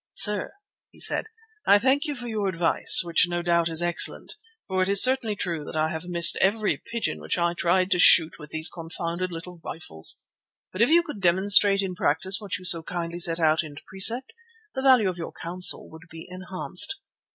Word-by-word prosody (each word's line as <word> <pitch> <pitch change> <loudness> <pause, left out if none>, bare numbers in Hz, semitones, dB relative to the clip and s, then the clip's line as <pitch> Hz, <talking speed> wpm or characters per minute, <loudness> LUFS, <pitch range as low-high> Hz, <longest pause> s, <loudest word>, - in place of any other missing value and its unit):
"Sir," 210 - 0 0.3
he - - -22
said, - - 0 0.4
"I 200 - +6
thank 265 +7 0
you 295 -2 -4
for 245 -1 -8
your 215 -3 -3
advice, 170 -3 +2
which 170 +1 +1
no 175 0 -3
doubt 170 -1 0
is 165 +1 0
excellent, 175 0 0 0.3
for 190 -1 -2
it 185 - 0
is 200 0 +4
certainly 255 -5 +1
true 170 -5 -4
that 145 - -9
I 155 0 0
have 160 +2 -7
missed 170 -1 +4
every 210 +2 +1
pigeon 235 -1 -5
which - - -3
I 170 0 0
tried 180 +2 0
to 180 - +1
shoot 165 -2 +4
with 150 -1 -12
these 160 +1 0
confounded 170 +2 -6
little 170 +1 -10
rifles. 80 - -1 0.5
But 185 - -4
if 235 - +3
you 340 +2 +4
could 295 -11 -9
demonstrate 195 +2 +4
in 190 -1 -4
practice 180 +5 0
what 205 -3 -4
you 185 - -12
so 170 -2 +5
kindly 170 +1 -6
set 165 -1 0
out 160 -1 +2
in 150 -3 -11
precept, 230 - +2 0.4
the 265 - -4
value 255 -6 +4
of 180 -1 -4
your 165 - -7
counsel 180 +2 +1
would 160 +2 -15
be 165 0 -11
enhanced." 185 - -1
180 Hz, 200 wpm, -24 LUFS, 170-205 Hz, 0.5 s, I